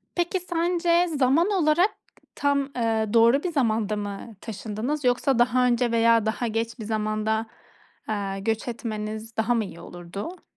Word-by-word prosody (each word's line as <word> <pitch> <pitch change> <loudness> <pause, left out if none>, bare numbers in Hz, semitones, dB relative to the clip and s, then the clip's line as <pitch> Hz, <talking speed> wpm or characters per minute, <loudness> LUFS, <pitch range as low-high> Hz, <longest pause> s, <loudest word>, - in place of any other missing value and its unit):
Peki, 350 +2 0
sence 345 0 +1
zaman 280 +8 +3
olarak 350 0 +3 0.5
tam, 280 -1 +1
ııı, 225 -2 0
doğru 235 +5 +5
bir 360 - -1
zamanda 220 -7 +1
mı 205 +2 -6
taşındınız 225 +6 -4
yoksa 250 +1 +2
daha 250 +1 +3
önce 240 -1 +2
veya 230 -1 +4
daha 220 +2 -1
geç 230 +2 -3
bir 220 - -6
zamanda, 215 0 -1 0.6
eee, 200 -2 -2
göç 220 +3 -2
etmeniz 220 -1 -5
daha 220 +2 +2
mı 225 -2 0
iyi 170 - -10
olurdu? 175 - -8
230 Hz, 150 wpm, -25 LUFS, 215-280 Hz, 0.6 s, doğru